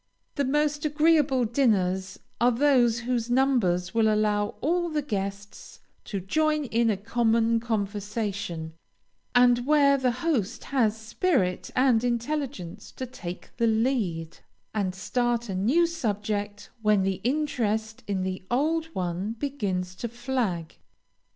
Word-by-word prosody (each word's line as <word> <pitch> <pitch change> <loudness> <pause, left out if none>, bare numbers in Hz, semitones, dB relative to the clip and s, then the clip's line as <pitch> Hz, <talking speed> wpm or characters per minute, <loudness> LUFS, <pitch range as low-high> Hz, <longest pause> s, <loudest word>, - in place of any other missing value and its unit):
The 285 - 0
most 295 +2 +1
agreeable 300 -4 +3
dinners 195 -6 +1 0.2
are 240 +2 +4
those 240 -3 +3
whose 240 -1 -1
numbers 240 -9 +2
will 225 -1 +3
allow 210 -1 +1
all 345 +3 0
the 305 -2 -1
guests 200 -4 -5 0.3
to 200 - -3
join 305 - +1
in 230 -1 +1
a 210 - +1
common 230 +2 +2
conversation, 200 -6 -3 0.6
and 245 0 +5
where 285 -2 +5
the 255 -1 +2 0.2
host 245 - 0
has 225 -6 +1
spirit 220 - 0
and 250 -3 +3
intelligence 245 - -3
to 260 - -5
take 190 -9 -8
the 235 -1 +2
lead, 220 -9 0 0.3
and 195 -4 -1
start 240 +3 -1
a - - -2
new 245 - +3
subject 210 -9 -3
when 210 -3 +3
the 190 -1 -1
interest 225 -6 -1
in 195 -2 -1
the 185 0 -3
old 315 +6 +1
one 180 +4 -2
begins 205 -9 -3
to 235 - -3
flag. 235 -8 -3
230 Hz, 130 wpm, -26 LUFS, 200-265 Hz, 0.6 s, and